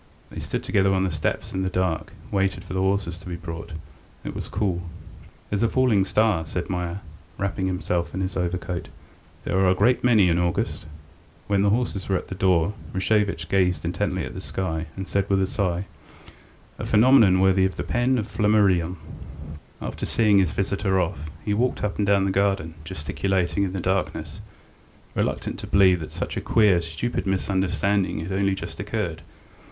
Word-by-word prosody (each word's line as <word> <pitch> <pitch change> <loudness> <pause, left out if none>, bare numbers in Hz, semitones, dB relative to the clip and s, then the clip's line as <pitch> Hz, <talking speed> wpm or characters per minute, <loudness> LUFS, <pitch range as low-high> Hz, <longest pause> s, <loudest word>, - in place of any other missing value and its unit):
They - - -6
stood - - -3
together 95 -1 +2
on 95 - +2
the 95 - 0
steps 80 -1 -2
in 95 - -1
the 95 - 0
dark, 90 -3 -1
and - - -18
waited 95 -1 0
for - - -8
the 95 - 0
horses 95 -3 0
to 90 - -10
be 90 - -3
brought. 85 -1 -7 0.5
It - - -5
was - - -5
cool. 95 -3 -1 0.7
"There's 100 0 0
a 115 - +4
falling 115 -6 +3
star," 105 -3 +2
said 90 +2 -3
Meier, 90 +1 -3 0.4
wrapping 95 -1 -1
himself 90 -2 -1
in 95 - -2
his 95 0 -2
overcoat. 90 -1 -3 0.5
"There 95 - 0
are 95 -1 +4
a 90 - +3
great 120 +6 +3
many 110 -6 +5
in 85 0 +2
August." 85 -2 -1 0.6
When 100 -1 +1
the 100 - +3
horses 105 -3 -1
were 95 - +2
at - - -7
the - - -4
door, 95 -1 +2 0.2
Rashevitch 100 -3 +1
gazed 90 -3 +1
intently 90 0 -1
at - - -7
the - - -6
sky, 80 -4 -3
and 95 0 -5
said 100 0 0
with 100 -1 +3
a 95 - +2
sigh: 95 -2 -1 0.9
"A - - -4
phenomenon 110 -4 +5
worthy 95 0 +4
of 95 - -1
the - - -3
pen 125 +2 +1
of 110 -2 -2
Flammarion... 100 -6 +2 0.5
." 75 0 -13
After - - -4
seeing 105 -3 +4
his 95 - +2
visitor 95 0 0
off, 80 -4 -2 0.2
he 105 - +1
walked 125 +4 0
up 105 -1 -2
and 100 - +1
down 100 -1 +4
the 95 - +1
garden, 95 -4 +1
gesticulating 90 +5 -1
in 95 - -4
the 95 - -2
darkness, 80 -3 -2 0.7
reluctant - - -2
to - - -7
believe 95 -2 +5
that 75 - -7
such - - -4
a - - -1
queer, 105 -6 +4
stupid 85 +9 -3
misunderstanding 95 -1 0
had 85 +4 -5
only 95 0 +1
just - - -7
occurred. - - -3
95 Hz, 190 wpm, -24 LUFS, 90-100 Hz, 0.9 s, many